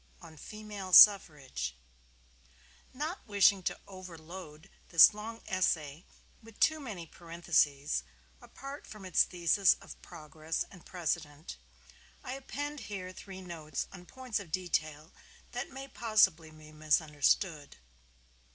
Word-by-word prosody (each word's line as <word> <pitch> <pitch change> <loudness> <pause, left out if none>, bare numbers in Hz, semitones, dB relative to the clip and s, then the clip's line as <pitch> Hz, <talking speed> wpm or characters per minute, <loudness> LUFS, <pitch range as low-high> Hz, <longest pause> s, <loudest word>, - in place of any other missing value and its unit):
ON 160 - -13
FEMALE 205 +2 -8
SUFFRAGE 140 - +6 1.2
Not 305 +8 -4
wishing 200 -1 +4
to - - -3
overload 175 -3 -11 0.2
this 165 +4 +8
long 225 +2 -8
essay 165 -4 -1 0.4
with 225 -1 -16
too 315 -1 +3
many 210 - -7
parentheses, 155 - 0 0.4
apart 275 +2 -10
from 210 -3 -11
its 185 - +3
thesis 180 +2 +3
of - - -13
progress 155 +1 -5
and 185 -4 -14
precedent, 155 -3 -4 0.7
I 255 - -5
append 290 +2 -5
here 185 -3 -6
three 190 0 -10
notes 160 -5 -5
on 180 -2 -12
points 255 -4 -4
of 180 -6 -11
detail 155 -3 -2 0.4
that - - -5
may 270 +1 -8
possibly 215 -10 +2
be 155 -1 -15
misunderstood. 155 - 0
180 Hz, 115 wpm, -31 LUFS, 155-210 Hz, 1.2 s, this